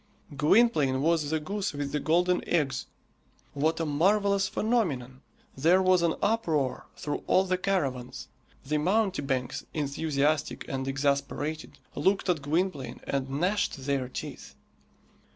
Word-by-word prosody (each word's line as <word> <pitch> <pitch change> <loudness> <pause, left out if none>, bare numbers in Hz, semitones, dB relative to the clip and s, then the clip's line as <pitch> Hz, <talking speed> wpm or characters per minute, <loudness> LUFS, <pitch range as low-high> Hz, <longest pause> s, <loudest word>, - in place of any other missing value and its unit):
Gwynplaine 150 - +3
was 160 -2 +2
the 160 0 0
goose 200 +5 -3
with 145 -1 -3
the 150 - 0
golden 175 +4 +2
eggs! 135 -6 0 0.7
What 155 +3 0
a 165 - 0
marvellous 195 +6 +2
phenomenon! 145 - -1 0.3
There 165 +7 +4
was 185 -1 +4
an 170 -1 +2
uproar 160 - 0
through 145 - -3
all 185 - +4
the 185 -1 -1
caravans. 135 -11 -2 0.4
The 150 +2 0
mountebanks, 150 - 0
enthusiastic 150 0 -1
and 135 0 -3
exasperated, 140 +3 -2 0.2
looked 195 0 +1
at 170 -4 +1
Gwynplaine 155 -1 -2
and 135 -1 -2
gnashed 180 +7 0
their 135 -3 -1
teeth. - - -7
155 Hz, 125 wpm, -28 LUFS, 140-185 Hz, 0.7 s, There